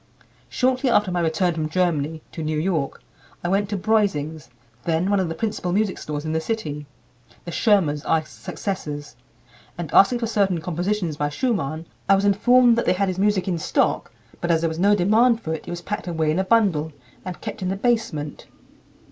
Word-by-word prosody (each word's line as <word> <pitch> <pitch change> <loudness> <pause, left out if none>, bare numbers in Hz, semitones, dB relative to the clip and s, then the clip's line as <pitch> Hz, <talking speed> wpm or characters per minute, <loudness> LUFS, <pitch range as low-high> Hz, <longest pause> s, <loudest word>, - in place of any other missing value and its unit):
Shortly 255 +1 +1
after 205 -5 +3
my 175 - 0
return 170 +2 +1
from 155 -1 -2
Germany 160 -3 0
(to 165 - -6
New 155 0 -1
York) 160 -4 -1 0.4
I 175 - -1
went 200 +1 +1
to 205 - -1
Breusing's, 170 - 0 0.3
then 170 +5 0
one 200 - +3
of 185 -3 0
the 165 - -4
principal 195 -2 -2
music 200 +1 0
stores 150 0 -5
in 155 - -2
the 160 - 0
city, 155 -8 -4 0.6
the 170 - -5
Schirmers 170 -9 +2
are 160 - +2
his 155 - -16
successors, 145 -3 -5 0.6
and 170 -3 -5
asking 220 +5 +6
for 235 - -2
certain 200 -5 +1
compositions 175 0 -2
by 145 0 0
Schumann, 160 - -2 0.2
I 195 - +7
was 195 +1 +1
informed 235 +4 +5
that - - -2
they - - +5
had 195 +1 0
his 185 0 -3
music 205 -1 +2
in 175 -3 -1
stock, - - 0 0.3
but 175 - -3
as 165 -1 +3
there 165 - +1
was 160 +1 -5
no 200 +3 +5
demand 220 +5 +4
for 160 - -3
it, 160 - -6
it - - -5
was 175 0 -5
packed 210 0 -4
away 160 -3 0
in 160 - 0
a - - +2
bundle, 190 -8 +2 0.3
and 185 -2 -6
kept - - -6
in 185 - -1
the 190 - -1
basement." 195 - -1
180 Hz, 205 wpm, -23 LUFS, 160-205 Hz, 0.6 s, I